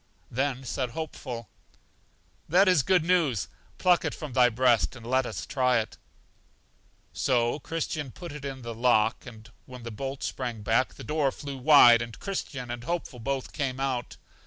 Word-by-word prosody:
Then 135 +1 -1
said 130 0 -2
Hopeful: 125 -5 -6 1.0
That 185 +5 +5
is 180 -6 +5
good 180 +3 +3
news; 165 - +2 0.3
pluck 180 -1 +3
it - - -2
from 150 -5 -7
thy 125 -1 +5
breast, 120 -6 +2
and 115 -2 -11
let 130 +1 +1
us - - -5
try 125 -2 +2
it. 110 - -3 1.1
So 120 +2 +1
Christian 155 -2 -3
put 170 +6 -9
it 145 -1 -8
in 135 -2 -6
the 115 0 -5
lock, 115 0 +2 0.4
when 125 -2 -10
the 115 - -6
bolt 135 +5 -5
sprang 115 -4 -4
back, 115 +4 +1
the - - -10
door 150 -3 +1
flew 140 -1 -7
wide, 125 -4 +8
and 115 -1 -6
Christian 135 -11 -4
and 120 -1 -5
Hopeful 165 -4 -4
both 135 +2 -3
came 135 -3 -2
out. 130 -3 -2
130 Hz, 165 wpm, -27 LUFS, 120-145 Hz, 1.1 s, wide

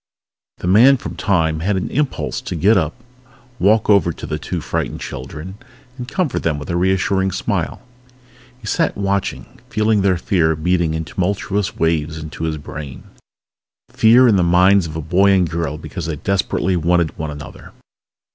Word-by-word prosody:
The - - -7
Man 120 +9 +6
from - - -7
Time 80 -6 +1
had 100 +5 0
an 95 - -2
impulse 145 0 -2
to - - -5
get 100 +8 +4
up, 80 -1 0 0.6
walk 105 +4 +3
over 100 -4 +4
to - - -8
the - - -4
two - - -4
frightened - - -3
children 95 +7 -8 0.4
and 125 -2 -7
comfort 170 0 -1
them 80 -3 0
with 75 +3 -6
a - - -1
reassuring 95 +1 +1
smile. - - -2 0.8
He 115 - -14
sat 105 - 0
watching, 100 0 -3
feeling 110 -1 +2
their 95 -2 +2
fear 85 -3 +1
beating 85 0 0
in 80 0 -3
tumultuous 100 +2 -2
waves 80 -1 0
into 80 +1 -6
his 80 -1 -2
brain. 70 -2 -8 0.9
Fear 125 0 +5
in 105 -4 +4
the - - +3
minds 90 +2 +4
of 80 - -8
a 80 - -3
boy 95 +5 +3
and 90 -2 +3
a - - -10
girl 80 -3 -2
because 80 +1 -6
they 80 - -2
desperately 95 +2 -1
wanted 85 -1 +1
one 80 -1 -3
another! 75 -2 -10
90 Hz, 175 wpm, -19 LUFS, 80-100 Hz, 0.9 s, Man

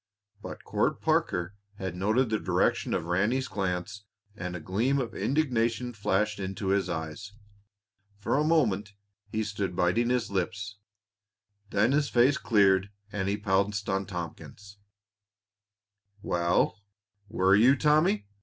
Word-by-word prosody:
But - - -8
Court - - 0
Parker 90 +2 0 0.2
had 95 -3 -5
noted 110 +6 +1
the 110 - +1
direction - - +1
of - - -2
Ranny's 105 +10 +1
glance, 95 0 -3 0.3
and 90 -3 -5
a - - -4
gleam 110 - 0
of 125 -4 -2
indignation 125 -4 0
flashed 105 0 0
into 95 +1 -3
his 95 -2 +1
eyes. 80 +5 -5 0.8
For 100 - -1
a 150 - +2
moment 110 - +1 0.3
he 110 +1 -2
stood 100 -3 -3
biting 95 +7 +2
his 125 -4 0
lips; 100 +2 -3 0.9
then 105 +5 +2
his 145 0 +1
face 125 +4 +3
cleared 100 -3 +3 0.2
and 100 -1 -2
he 100 - 0
pounced 100 0 0
on 95 0 -1
Tompkins. 100 +3 -8 1.4
"Well, 85 +3 +1 0.5
were 95 -3 +3
you, 120 +6 +6
Tommy!" 150 -9 +2
100 Hz, 130 wpm, -28 LUFS, 95-115 Hz, 1.4 s, you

